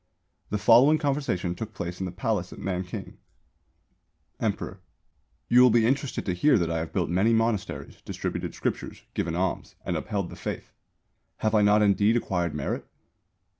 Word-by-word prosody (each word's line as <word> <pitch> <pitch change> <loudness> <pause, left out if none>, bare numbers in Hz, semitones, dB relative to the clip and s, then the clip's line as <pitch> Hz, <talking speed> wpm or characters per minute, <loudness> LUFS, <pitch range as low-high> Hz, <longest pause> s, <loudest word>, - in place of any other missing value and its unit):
The 105 - 0
following 125 +9 +6
conversation 135 - -1
took 110 +4 -7
place 85 +1 -5
in 95 - -2
the - - -5
Palace 95 -1 -2
at - - -10
Nanking: 90 -1 -5 1.2
Emperor: - - -3 0.7
You 125 +1 +6
will 125 - +8
be 115 0 +4
interested 135 +2 0
to 90 - 0
hear 130 +9 +4
that 85 -3 0
I 80 - 0
have 80 0 -4
built - - 0
many 100 +6 +3
monasteries, 115 -2 -1
distributed - - -4
scriptures, - - -4
given 85 0 -2
alms, 90 0 -2
and - - -1
upheld 100 -4 -3
the - - -8
Faith. - - -6 0.7
Have 110 - +2
I 105 - +5
not 105 +1 +5
indeed 105 +3 +4
acquired 90 -8 -1
merit? 70 - -3
105 Hz, 165 wpm, -27 LUFS, 90-115 Hz, 1.2 s, will